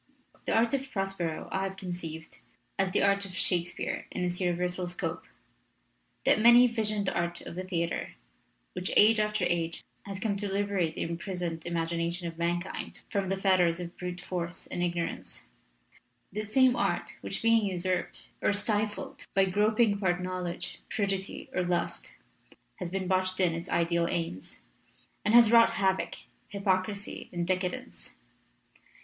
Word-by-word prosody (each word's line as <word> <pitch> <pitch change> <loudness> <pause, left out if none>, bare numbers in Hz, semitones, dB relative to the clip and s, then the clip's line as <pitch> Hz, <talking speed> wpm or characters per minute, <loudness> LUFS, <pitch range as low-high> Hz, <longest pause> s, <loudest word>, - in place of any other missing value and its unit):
"The - - +1
art 230 +2 +3
of 270 0 -1
Prospero 195 -5 -2
I 190 - 0
have 195 0 -3
conceived 170 -4 -6 0.4
as 195 -1 +2
the 200 - +2
art 200 0 +4
of 190 -2 -7
Shakespeare 175 -1 0
in 180 - -3
its 180 +1 -2
universal 180 0 0
scope 175 - -4 1.0
that - - +5
many 240 +2 +9
visioned 215 -4 0
art 170 -1 -1
of - - -8
the 185 +2 -4
theater, 170 -3 -2 0.6
which 180 0 -2
age 220 +1 +7
after 210 -2 +1
age 170 -1 -1 0.2
has 195 -1 -5
come 200 -1 0
to 200 -1 -3
liberate 195 -4 0
the - - -1
imprisoned 170 -1 -4
imagina 170 0 -1
tion 175 0 -4
of 165 0 -7
mankind 175 +2 -2
from 195 -2 0
the 195 - 0
fetters 185 -3 +3
of 175 0 -6
brute 180 0 -5
force 175 -1 -4
and 175 - -4
ignorance; 170 - -3 0.8
that 215 +1 -4
same 260 0 +5
art - - -1
which, - - -4
being 230 -1 +5
usurped 185 -1 -2 0.2
or - - +3
stifled 210 0 -1
by 195 -1 +5
groping 210 +2 +3
part 180 -3 +1
knowledge, 180 -1 -4
prudery, 195 -2 -2
or 180 - +1
lust, 175 0 -2 0.6
has 180 - -4
been 190 0 -2
botched 185 0 +1
in 180 -3 +3
its 170 +1 -5
ideal 170 0 +2
aims, 165 - -4 0.6
and 210 - +3
has 235 -2 +8
wrought 230 -1 +7
havoc, 190 -3 +1 0.3
hypocrisy, 200 0 -1
and 175 -1 -2
decadence. 185 +8 -3
185 Hz, 155 wpm, -29 LUFS, 175-205 Hz, 1.0 s, many